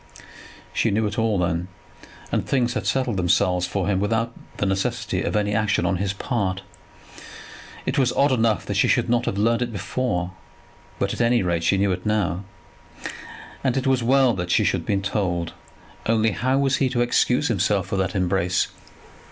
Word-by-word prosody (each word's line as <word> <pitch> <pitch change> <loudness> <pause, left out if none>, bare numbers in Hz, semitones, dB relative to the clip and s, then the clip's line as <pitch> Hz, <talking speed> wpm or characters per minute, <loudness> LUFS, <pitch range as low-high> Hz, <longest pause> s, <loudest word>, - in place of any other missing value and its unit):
She - - +1
knew 110 +2 +1
it 105 +3 -2
all, 110 -2 +1
then, 85 0 -1 0.6
and - - +1
things 125 -3 0
had - - -3
settled 130 -6 0
themselves 90 0 +2
for 95 0 -2
him 100 -2 +1
without 115 +3 0 0.2
the - - 0
necessity 115 +5 -1
of - - -2
any 105 -1 +1
action 105 0 +1
on 95 - +1
his 95 +1 -1
part. 95 -3 -2 1.2
It - - 0
was 125 -2 +3
odd 140 0 +3
enough 115 -4 +1
that - - -3
she - - +4
should - - +2
not 120 0 +2
have 100 - -1
learned 115 +3 +2
it 120 -1 -1
before, 100 -4 -2 0.7
but - - -1
at - - -2
any 120 -1 +3
rate 85 -2 0
she 95 +4 +3
knew 100 0 +2
it 90 0 -3
now. 100 -4 0 1.2
And 130 -1 +1
it 135 - -1
was 130 -2 +2
well 130 +1 +4
that 90 -3 -4
she - - +3
should - - +1
have - - -11
been 100 -1 0
told; 90 -5 -1 0.5
only 110 0 +3
how 130 +5 0
was 135 -1 +2
he 130 -1 +1
to 120 -1 0
excuse 125 +3 +2
himself 100 -3 +1
for 100 0 -3
that 95 +2 -1
embrace? 90 -1 +1
105 Hz, 190 wpm, -23 LUFS, 95-120 Hz, 1.2 s, she